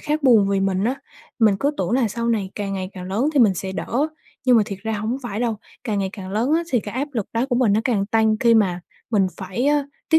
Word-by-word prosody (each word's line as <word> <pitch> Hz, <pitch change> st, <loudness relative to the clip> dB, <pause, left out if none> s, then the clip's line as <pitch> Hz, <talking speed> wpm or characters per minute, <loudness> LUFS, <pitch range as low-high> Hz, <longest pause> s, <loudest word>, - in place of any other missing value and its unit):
khác 300 Hz, 0 st, -1 dB
buồn 225 Hz, -7 st, +5 dB
vì 195 Hz, -1 st, +1 dB
mình 195 Hz, 0 st, 0 dB
á. 245 Hz, +4 st, +1 dB, 0.4 s
Mình 215 Hz, -4 st, +4 dB
cứ 285 Hz, -, +2 dB
tưởng 180 Hz, -1 st, -1 dB
là 245 Hz, -2 st, +2 dB
sau 235 Hz, +3 st, -3 dB
này 210 Hz, -5 st, 0 dB
càng 200 Hz, -2 st, -3 dB
ngày 190 Hz, 0 st, -4 dB
càng 180 Hz, -2 st, -8 dB
lớn 205 Hz, +10 st, 0 dB
thì 285 Hz, -, +3 dB
mình 210 Hz, -5 st, +5 dB
sẽ 190 Hz, +1 st, -4 dB
đỡ, 250 Hz, +9 st, -1 dB, 0.4 s
nhưng 250 Hz, -2 st, +5 dB
mà 220 Hz, -, +5 dB
thiệt 200 Hz, -4 st, -6 dB
ra 220 Hz, 0 st, -2 dB
hổng 220 Hz, +4 st, -2 dB
phải 220 Hz, -2 st, -4 dB
đâu, 235 Hz, -3 st, 0 dB, 0.3 s
càng 215 Hz, -4 st, -1 dB
ngày 195 Hz, -1 st, 0 dB
càng 190 Hz, -3 st, -8 dB
lớn 230 Hz, +9 st, 0 dB
á 335 Hz, -, 0 dB
thì 245 Hz, -, +3 dB
cái 205 Hz, +1 st, -8 dB
áp 275 Hz, +4 st, -2 dB
lực 225 Hz, -6 st, -2 dB
đó 230 Hz, +3 st, 0 dB
của 250 Hz, -3 st, 0 dB
mình 240 Hz, -5 st, +3 dB
nó 215 Hz, -, +3 dB
càng 210 Hz, -6 st, +1 dB
tăng 220 Hz, 0 st, +2 dB
khi 235 Hz, -1 st, +5 dB
mà 190 Hz, -5 st, +2 dB, 0.3 s
mình 200 Hz, -4 st, +3 dB
phải, 195 Hz, +7 st, -3 dB
a, 290 Hz, -1 st, +3 dB, 0.2 s
tiếp 320 Hz, -, +6 dB
220 Hz, 275 wpm, -22 LUFS, 195-245 Hz, 0.4 s, tiếp